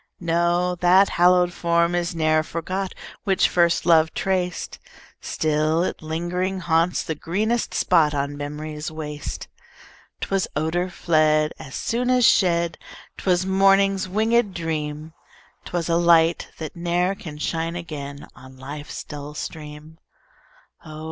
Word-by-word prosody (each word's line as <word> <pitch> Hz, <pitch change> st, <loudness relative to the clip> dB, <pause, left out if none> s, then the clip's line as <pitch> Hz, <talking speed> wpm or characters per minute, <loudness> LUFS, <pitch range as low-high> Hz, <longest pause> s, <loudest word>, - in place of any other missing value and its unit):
No, 175 Hz, +1 st, +1 dB
that 185 Hz, +3 st, +5 dB
hallowed 180 Hz, 0 st, +4 dB
form 170 Hz, 0 st, +1 dB
is 175 Hz, 0 st, -1 dB
ne'er 155 Hz, -1 st, +2 dB
forgot 185 Hz, +4 st, -4 dB, 0.3 s
Which 195 Hz, -2 st, +3 dB
first 170 Hz, -2 st, +2 dB
love 160 Hz, -2 st, +4 dB
traced; 180 Hz, -2 st, -2 dB, 0.4 s
Still 155 Hz, +2 st, 0 dB
it -, -, -3 dB
lingering 175 Hz, +4 st, -2 dB
haunts 165 Hz, +1 st, +1 dB
the 160 Hz, -, -3 dB
greenest 215 Hz, +10 st, -1 dB
spot 150 Hz, -2 st, +3 dB
On 140 Hz, +1 st, -2 dB
memory's 150 Hz, +1 st, -5 dB
waste. 150 Hz, -2 st, -6 dB, 0.7 s
'Twas 195 Hz, -1 st, 0 dB
odor 165 Hz, +4 st, -1 dB
fled 155 Hz, -3 st, +2 dB
As 130 Hz, -, -9 dB
soon 245 Hz, +2 st, -1 dB
as 250 Hz, -1 st, +4 dB
shed; 170 Hz, -3 st, +2 dB, 0.4 s
'Twas 185 Hz, -1 st, +1 dB
morning's 195 Hz, 0 st, +3 dB
winged 220 Hz, +1 st, +1 dB
dream; 155 Hz, -2 st, -4 dB, 0.5 s
'Twas 175 Hz, -2 st, -3 dB
a 170 Hz, -1 st, +2 dB
light, 170 Hz, -1 st, +4 dB
that 160 Hz, -2 st, -7 dB
ne'er 175 Hz, +2 st, 0 dB
can 180 Hz, -8 st, -9 dB
shine 165 Hz, +2 st, -2 dB
again 145 Hz, -5 st, -7 dB
On 130 Hz, 0 st, -14 dB
life's 145 Hz, +3 st, -7 dB
dull 150 Hz, 0 st, -8 dB
stream: 150 Hz, +1 st, -8 dB, 0.8 s
Oh! 155 Hz, -1 st, -9 dB
170 Hz, 130 wpm, -23 LUFS, 155-180 Hz, 0.8 s, that